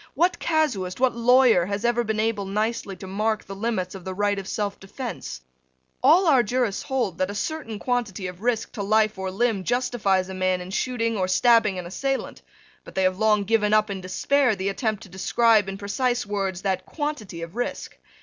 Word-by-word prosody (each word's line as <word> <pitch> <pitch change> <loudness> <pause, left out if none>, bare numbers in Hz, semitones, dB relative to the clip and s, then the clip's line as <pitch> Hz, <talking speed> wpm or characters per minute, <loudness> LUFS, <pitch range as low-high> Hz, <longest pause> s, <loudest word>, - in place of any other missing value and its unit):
What 350 +5 +2
casuist, 250 - 0
what 255 -1 +2
lawyer, 235 -6 +5
has 200 +3 -3
ever 240 0 +2
been 220 -1 -2
able 215 -2 0
nicely 210 0 -2
to 190 - -10
mark 215 +3 -1
the 195 - -7
limits 195 -3 -2
of 190 -2 -9
the 190 0 -5
right 205 0 +1
of 190 - -8
selfdefence? 200 - -5 0.6
All 370 +2 +6
our 275 -7 +5
jurists 240 -2 -1
bold 260 -7 -1
that 185 - +1
a 205 - -5
certain 295 -3 -4
quantity 220 -5 -2
of 180 0 -7
risk 235 -1 0
to 210 - -5
life 215 0 +2
or 190 0 -2
limb 205 0 0
justifies 220 -6 +1
a 190 - -7
man 185 -1 0
in 180 +1 -8
shooting 230 +1 -1
or 185 -1 0
stabbing 220 0 +4
an 180 - -5
assailant: 270 +10 -3 0.4
but - - -13
they 190 - +1
have 185 +1 +1
long 215 -2 +3
given 210 0 +2
up 215 -1 +2
in 190 -1 -4
despair 245 +7 +1
the 190 0 -2
attempt 215 +1 -2
to 200 - -13
describe, 210 +2 +3
in 195 - -5
precise 240 +5 -1
words, 195 -3 -3
that 190 -2 -1
quantity 285 - -4
of 170 +4 -9
risk. 245 - -4
210 Hz, 195 wpm, -24 LUFS, 190-240 Hz, 0.6 s, All